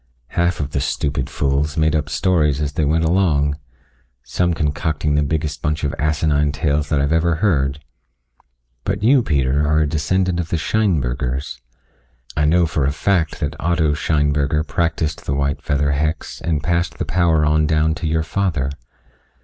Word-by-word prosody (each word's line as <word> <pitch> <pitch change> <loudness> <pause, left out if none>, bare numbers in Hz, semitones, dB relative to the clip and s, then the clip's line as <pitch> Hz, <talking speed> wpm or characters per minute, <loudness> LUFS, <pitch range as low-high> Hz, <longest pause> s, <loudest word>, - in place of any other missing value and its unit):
Half 85 +1 0
of 70 -1 -3
the 70 - -1
stupid 70 -1 -2
fools 70 +2 -1
made 80 0 +2
up 75 -1 -1
stories 80 -7 +1
as 75 -1 -2
they 75 - 0
went 80 +3 +1
along 80 -4 +1 0.6
some 90 -1 0
concocting 75 0 -1
the 75 - +2
biggest 75 0 -2
bunch 75 -1 -1
of 75 - -1
asinine 75 -1 +1
tales 75 -1 -1
that 75 - +1
I've 70 +1 0
ever 85 +1 +2
heard. 75 -6 0 1.0
But 100 +5 -2
you, 130 +3 +5
Peter, 70 - +1
are 75 +1 +2
a 75 - +2
descendant 90 +4 0
of 85 -2 -3
the 85 - 0
Scheinbergers. 70 - -1 0.7
I 75 - +2
know 85 +3 +4
for 80 -4 -1
a 70 - +1
fact 85 +2 0
that 75 0 -2
Otto 80 -3 +1
Scheinberger 75 0 +1
practiced 80 -2 -2
the 70 - 0
white 70 +1 -1
feather 70 0 0
hex 75 +3 -2
and 80 -3 -1
passed 85 +1 0
the - - -2
power 80 -3 +2
on 75 0 +2
down 80 0 +2
to 85 0 -4
your 80 0 +1
father. 80 -6 -1
75 Hz, 170 wpm, -20 LUFS, 75-85 Hz, 1.0 s, you